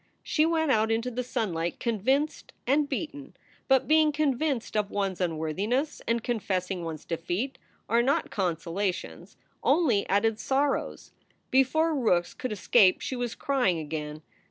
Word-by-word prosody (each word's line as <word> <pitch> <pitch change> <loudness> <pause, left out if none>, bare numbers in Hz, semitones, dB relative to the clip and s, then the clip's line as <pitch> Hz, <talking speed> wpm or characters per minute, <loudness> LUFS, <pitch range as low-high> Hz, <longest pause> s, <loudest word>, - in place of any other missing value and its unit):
She 310 0 +2
went 320 -3 +1
out 220 -2 +3
into 230 +3 0
the 250 +1 -3
sunlight 185 -9 -2
convinced 260 +6 0
and 285 +3 +2
beaten. 285 -1 -5 0.3
But 265 -1 +3
being 310 0 +5
convinced 285 -4 -1
of 210 -1 +1
one 200 -2 -1
s 185 - -9
unworthiness 185 - -1
and 230 -1 0
confessing 190 -6 -2
one 165 -1 -4
s 155 - -15
defeat 175 +10 -3 0.3
are 235 +1 +3
not 270 +4 0
consolations; 180 +1 -3 0.2
only 275 - +2
added 215 +3 +2
sorrows. 275 +3 -1 0.4
Before 315 +5 +3
Rookes 200 - +1
could 255 - -5
escape 200 -1 +4
she 260 - -4
was 245 -2 -3
crying 250 -11 +1
again. 150 0 -5
230 Hz, 145 wpm, -27 LUFS, 185-275 Hz, 0.4 s, being